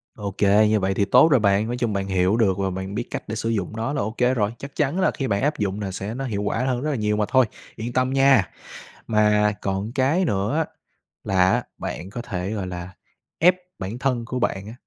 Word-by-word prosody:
Ô 100 Hz, -2 st, -4 dB
kê, 105 Hz, +1 st, +4 dB
như 110 Hz, -, +3 dB
vậy 95 Hz, 0 st, 0 dB
thì 100 Hz, +1 st, +1 dB
tốt 125 Hz, +8 st, +6 dB
rồi 135 Hz, -, +5 dB
bạn. 100 Hz, 0 st, +2 dB
Nói 120 Hz, +1 st, -3 dB
chung 120 Hz, -4 st, -1 dB
bạn 100 Hz, 0 st, -2 dB
hiểu 95 Hz, +3 st, +2 dB
được 100 Hz, -5 st, +2 dB
và 95 Hz, -1 st, 0 dB
bạn 95 Hz, +2 st, -5 dB
biết 120 Hz, -, -1 dB
cách -, -, -4 dB
để 110 Hz, -, -4 dB
sử 115 Hz, +1 st, -2 dB
dụng 105 Hz, -2 st, -2 dB
nó 115 Hz, +5 st, -2 dB
là 140 Hz, -, -1 dB
ô 110 Hz, -, -2 dB
kê 125 Hz, +1 st, +3 dB
rồi, 105 Hz, -2 st, 0 dB
chắc 140 Hz, 0 st, -9 dB
chắn 145 Hz, +5 st, 0 dB
là 185 Hz, -, +3 dB
khi 135 Hz, -, -3 dB
bạn 100 Hz, -2 st, 0 dB
áp 150 Hz, +3 st, 0 dB
dụng 100 Hz, 0 st, -1 dB
nà 100 Hz, -2 st, -3 dB
sẽ 100 Hz, +3 st, -5 dB
nó 135 Hz, +3 st, -4 dB
hiệu 105 Hz, -5 st, -2 dB
quả 110 Hz, +2 st, -1 dB
hơn 125 Hz, -2 st, 0 dB
rất 150 Hz, -, -1 dB
là 140 Hz, -, -1 dB
nhiều 105 Hz, -2 st, 0 dB
mà 105 Hz, -, +1 dB
thôi, 130 Hz, -2 st, +4 dB, 0.3 s
yên 115 Hz, +2 st, -5 dB
tâm 130 Hz, +1 st, +1 dB
nha. 135 Hz, -9 st, +4 dB, 0.6 s
Mà 105 Hz, -1 st, +3 dB
còn 100 Hz, +3 st, -2 dB
cái 140 Hz, +8 st, +2 dB
nữa 100 Hz, -, 0 dB
á 160 Hz, -, +1 dB, 0.6 s
là 95 Hz, -1 st, +3 dB
á -, -, +1 dB
bạn 95 Hz, -, -5 dB
có 120 Hz, +2 st, -6 dB
thể, 95 Hz, -4 st, -4 dB
gọi 100 Hz, -4 st, -3 dB
là, 90 Hz, +1 st, -7 dB, 0.5 s
ép 180 Hz, +2 st, +6 dB, 0.2 s
bản 100 Hz, +5 st, -5 dB
thân 125 Hz, -3 st, 0 dB
của 125 Hz, +2 st, -3 dB
bạn 100 Hz, -4 st, -1 dB
á, 110 Hz, -, -8 dB
110 Hz, 260 wpm, -23 LUFS, 100-125 Hz, 0.6 s, tốt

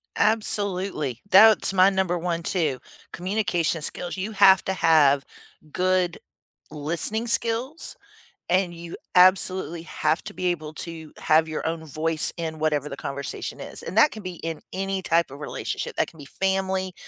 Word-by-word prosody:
Absolutely. 195 Hz, -, 0 dB
That's 210 Hz, +1 st, +6 dB
my 190 Hz, 0 st, +6 dB
number 190 Hz, -2 st, 0 dB
one 170 Hz, -1 st, -2 dB
too, 155 Hz, -8 st, -1 dB, 0.3 s
communication 180 Hz, -4 st, -1 dB
skills, 175 Hz, +3 st, -5 dB
you 195 Hz, +4 st, -3 dB
have 195 Hz, -3 st, +6 dB
to 190 Hz, -, -1 dB
have 145 Hz, -6 st, +4 dB, 0.5 s
good 185 Hz, -1 st, 0 dB, 0.5 s
listening 170 Hz, +10 st, -1 dB
skills, 235 Hz, +7 st, 0 dB, 0.5 s
and 180 Hz, -1 st, +1 dB
you 170 Hz, 0 st, -8 dB, 0.2 s
absolutely 185 Hz, -2 st, +4 dB
have 155 Hz, 0 st, -1 dB
to 215 Hz, -, -7 dB
be 185 Hz, -, -2 dB
able 155 Hz, -4 st, -2 dB
to 160 Hz, -1 st, -8 dB
have 160 Hz, +1 st, +3 dB
your 155 Hz, -, -4 dB
own 165 Hz, 0 st, -3 dB
voice 155 Hz, +1 st, 0 dB
in 160 Hz, -2 st, -4 dB
whatever 150 Hz, -2 st, 0 dB
the 140 Hz, -, -7 dB
conversation 140 Hz, 0 st, -6 dB
is, -, -, -6 dB
and -, -, -6 dB
that 300 Hz, -, +6 dB
can 215 Hz, -, -8 dB
be 180 Hz, -1 st, -6 dB
in 165 Hz, -1 st, -5 dB
any 195 Hz, 0 st, -2 dB
type 170 Hz, -1 st, +1 dB
of 140 Hz, -, -10 dB
relationship, 150 Hz, -, -5 dB
that -, -, +1 dB
can 165 Hz, -, -15 dB
be 145 Hz, -, -10 dB
family, 190 Hz, +3 st, -1 dB
175 Hz, 160 wpm, -24 LUFS, 160-190 Hz, 0.5 s, That's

